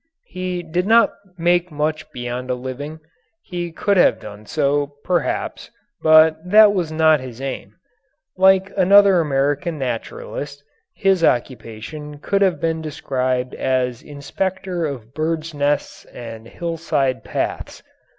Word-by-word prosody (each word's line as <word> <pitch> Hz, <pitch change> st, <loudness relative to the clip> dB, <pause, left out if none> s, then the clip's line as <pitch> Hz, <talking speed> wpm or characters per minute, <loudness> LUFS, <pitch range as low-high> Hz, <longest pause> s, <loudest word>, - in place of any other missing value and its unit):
He 180 Hz, -1 st, -4 dB
did 175 Hz, +3 st, -2 dB
not 230 Hz, +1 st, +5 dB, 0.2 s
make 175 Hz, +1 st, +2 dB
much 155 Hz, +1 st, -2 dB
beyond 125 Hz, +1 st, -5 dB
a 125 Hz, -, +1 dB
living. 140 Hz, +5 st, -7 dB, 0.4 s
He 175 Hz, -2 st, -5 dB
could 200 Hz, +4 st, 0 dB
have -, -, +4 dB
done 105 Hz, 0 st, -11 dB
so, 145 Hz, -1 st, 0 dB
perhaps, 175 Hz, -4 st, -2 dB, 0.3 s
but 155 Hz, 0 st, +6 dB
that 210 Hz, +3 st, +6 dB
was 175 Hz, -5 st, -1 dB
not 155 Hz, -1 st, +4 dB
his 130 Hz, -2 st, -9 dB
aim. 135 Hz, 0 st, -6 dB, 0.6 s
Like 190 Hz, +1 st, +4 dB
another 195 Hz, -1 st, +6 dB
American 145 Hz, +3 st, 0 dB
naturalist, 140 Hz, +2 st, -5 dB, 0.3 s
his 195 Hz, -3 st, +2 dB
occupation 130 Hz, +4 st, -2 dB
could 200 Hz, +7 st, -1 dB
have 185 Hz, -6 st, +2 dB
been 160 Hz, -1 st, -1 dB
described 130 Hz, -4 st, -2 dB
as 125 Hz, -2 st, -1 dB
inspector 175 Hz, +4 st, -3 dB
of 125 Hz, -4 st, -8 dB
birds' 160 Hz, +1 st, -2 dB
nests 145 Hz, 0 st, -1 dB
and 115 Hz, -2 st, -10 dB
hillside 155 Hz, -8 st, -2 dB
paths. -, -, -4 dB
155 Hz, 125 wpm, -20 LUFS, 130-175 Hz, 0.6 s, but